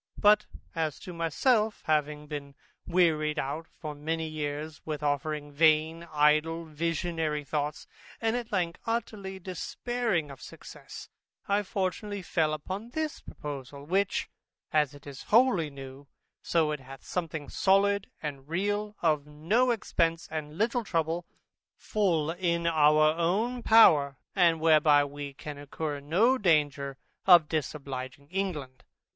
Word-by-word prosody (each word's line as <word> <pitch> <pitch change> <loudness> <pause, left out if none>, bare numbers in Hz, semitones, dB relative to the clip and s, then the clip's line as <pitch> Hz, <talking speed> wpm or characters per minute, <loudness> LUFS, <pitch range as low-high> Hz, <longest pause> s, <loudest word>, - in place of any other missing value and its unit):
But, 210 0 +5 0.3
as 160 -3 -2
to 180 - -8
myself, 210 - +1
having 150 -1 0
been 145 -2 -7 0.3
wearied 160 -4 +2
out 150 +4 -3
for 155 -2 -8
many 160 +2 -3
years 150 0 -4
with 155 -1 -4
offering 145 +1 -1
vain, 160 +2 +3
idle, 155 +2 +2
visionary 160 -1 -2
thoughts, 150 +1 -3 0.3
and 225 0 0
at 240 -2 -4
length 175 -4 -1
utterly 210 -4 -3
despairing 190 - -2
of 135 - -12
success, - - -11 0.4
I 200 +1 +2
fortunately 200 +1 -3
fell 160 -3 +1
upon 190 +9 -6
this 310 +4 -3
proposal, 140 -1 -8
which, 195 +5 0 0.5
as 150 -2 +2
it 145 - -15
is 140 -2 -9
wholly 220 -9 +4
new, 135 0 -10 0.3
so 160 -3 +1
it 150 - -3
hath 135 +1 -12
something 160 -4 -4
solid 200 +1 +2
and 140 -1 -6
real, 205 +4 -1
of 150 -3 +2
no 170 +13 +1
expence 165 -7 0
and 155 -1 -5
little 235 +3 +1
trouble, 165 -2 -1 0.5
full 170 -7 0
in 170 -1 -1
our 155 -1 +5
own 210 +9 0
power, 155 - +6 0.2
and 170 -4 +4
whereby 155 -2 +5
we 145 -1 -7
can 145 0 -8
incur 145 +1 -4
no 205 - +2
danger 145 -6 +1 0.3
in 175 -4 +8
disobliging 140 -3 -4
England. 155 -10 -3
160 Hz, 130 wpm, -29 LUFS, 150-190 Hz, 0.5 s, in